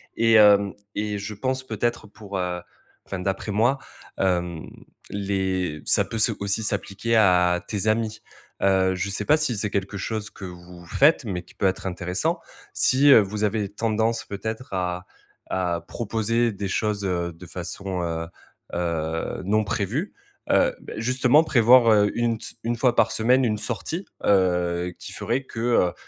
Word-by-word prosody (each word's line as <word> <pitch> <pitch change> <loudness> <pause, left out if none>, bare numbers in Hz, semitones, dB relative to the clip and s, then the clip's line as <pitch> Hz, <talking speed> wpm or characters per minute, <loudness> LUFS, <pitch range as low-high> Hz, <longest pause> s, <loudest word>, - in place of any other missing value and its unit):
et 115 0 +3
hem 100 -2 +6 0.2
et 105 0 -2
je 100 +2 -5
pense 130 +5 -2
peut-être 120 -1 -2
pour, 100 -1 -7
heu, 90 -1 -2 0.4
enfin, 95 - -5
d'après 95 +3 -2
moi, 120 +7 +2 0.4
hem, 90 -3 -1 0.4
les 95 -5 -2
ça - - +4
peut 115 - -5
se 115 +2 +3
aussi 100 +2 0
s'appliquer 105 +2 -1
à 90 -4 +4
tes 105 -1 -1
amis. 110 0 0 0.4
Heu, 95 -1 +3
je 95 +2 -2
sais 100 - -3
pas 150 - +5
si 155 -6 0
c'est 105 +1 -1
quelque 100 0 -2
chose 110 +1 -3
que 95 - -9
vous 90 -1 -11
faites, 140 - +3
mais 90 -5 -3
qui 90 - -19
peut - - -1
être 95 +1 -2
intéressant. 90 0 -1 0.3
Si, 140 +3 +4
heu, 130 - +9
vous 105 +1 -2
avez 105 -1 0
tendance, 110 +2 -1
peut-être, 110 +4 -6
à 90 -1 -2 0.4
à 90 -2 -1
proposer 115 +1 0
des 100 -1 -4
choses, 105 +1 -1
heu, 85 -2 -1
de 85 +3 -13
façon, 90 +2 -5
heu 85 -1 -2 0.5
heu, 80 0 -2
non 110 +3 +2
prévue, 110 - -2 0.4
heu, - - +3
bah, - - -9
justement, 125 +6 +3
prévoir, 120 -4 +6
heu, 105 -1 +4
une 120 -1 0
ts - - -6
1 120 +1 -1
fois 120 0 +2
par - - +3
semaine, 125 +4 +3
1 105 -2 0
sortie, 125 - -4 0.2
heu, 90 -2 +2
qui - - -9
ferait 125 +4 -2
que, 120 - -9
heu, 115 -7 +2
100 Hz, 170 wpm, -24 LUFS, 90-115 Hz, 0.5 s, heu